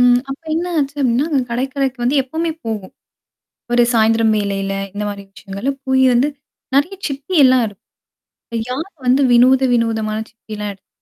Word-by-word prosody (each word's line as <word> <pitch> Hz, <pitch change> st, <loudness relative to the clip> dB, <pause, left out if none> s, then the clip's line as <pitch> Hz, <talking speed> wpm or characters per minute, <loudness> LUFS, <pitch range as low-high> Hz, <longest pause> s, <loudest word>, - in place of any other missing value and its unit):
ம் 245 Hz, 0 st, +6 dB
அப்ப 270 Hz, -, -6 dB
என்ன 340 Hz, +2 st, -1 dB
ஆச்சு 280 Hz, -1 st, -1 dB
அப்டின்னா 255 Hz, +2 st, +2 dB
அங்க 285 Hz, -3 st, +2 dB
கடற்கரைக்கு 260 Hz, +1 st, -2 dB
வந்து 265 Hz, +4 st, +2 dB
எப்பவுமே 320 Hz, +6 st, -2 dB
போவோம். 215 Hz, -4 st, -4 dB, 0.8 s
ஒரு 240 Hz, 0 st, +5 dB
சாயந்திரம் 225 Hz, 0 st, +3 dB
வேளையில 195 Hz, -1 st, -1 dB, 0.2 s
இந்த 205 Hz, +1 st, -4 dB
மாரி 200 Hz, -1 st, -6 dB
விஷயங்கள்ல 200 Hz, +7 st, -4 dB, 0.2 s
போய் 265 Hz, 0 st, +3 dB
வந்து 245 Hz, +4 st, +3 dB, 0.5 s
நெறய 290 Hz, +8 st, +2 dB
சிப்பிலாம் 275 Hz, -3 st, +3 dB
இருக்கும். 205 Hz, -2 st, -17 dB, 0.9 s
யார் 310 Hz, +9 st, -3 dB, 0.2 s
வந்து 255 Hz, +3 st, +4 dB
வினோத 255 Hz, +2 st, +6 dB
வினோதமான 220 Hz, -2 st, 0 dB
சித்தலாம் 210 Hz, -2 st, -7 dB
எடுத்துட்டு 195 Hz, -1 st, -16 dB
245 Hz, 145 wpm, -18 LUFS, 220-275 Hz, 0.9 s, ம்